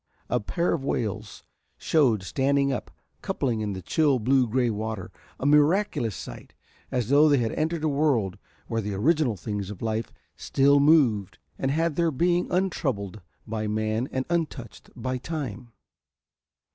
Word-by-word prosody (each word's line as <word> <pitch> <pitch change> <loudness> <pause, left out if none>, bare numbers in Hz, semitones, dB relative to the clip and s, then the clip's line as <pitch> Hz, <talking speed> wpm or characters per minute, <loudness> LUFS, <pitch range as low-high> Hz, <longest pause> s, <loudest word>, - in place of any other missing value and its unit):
A 125 - +2
pair 170 +11 -1
of 160 -5 -2
whales 110 -5 -3 0.3
shewed, 125 - +2
standing 140 +7 +1
up, - - -4 0.3
coupling 115 -5 -1
in 105 -2 -2
the 95 -1 -7
chill 145 - +2
blue 125 +2 +2
grey 120 +1 +1
water, 110 -3 -4 0.3
a - - -4
miraculous 150 - +3
sight, 65 -5 -9 0.3
as 125 -4 -1
though 145 +2 +6
they 145 - +4
had 115 -3 0
entered 160 +1 -1
a - - +2
world 140 -10 +1 0.3
where 115 0 -2
the 105 -1 -4
original 135 - +2
things 100 +2 -4
of 105 -1 -8
life 110 0 -2 0.2
still 140 +1 +3
moved 130 - +3 0.2
and 135 - 0
had 160 +1 0
their 170 -1 +3
being 175 +4 +1
untroubled 130 - -1 0.2
by 110 -1 -3
man 110 +3 -1
and 130 0 -2
untouched 155 -9 -3
by 130 +1 -3
Time. 125 -6 -5
125 Hz, 155 wpm, -26 LUFS, 110-150 Hz, 0.3 s, though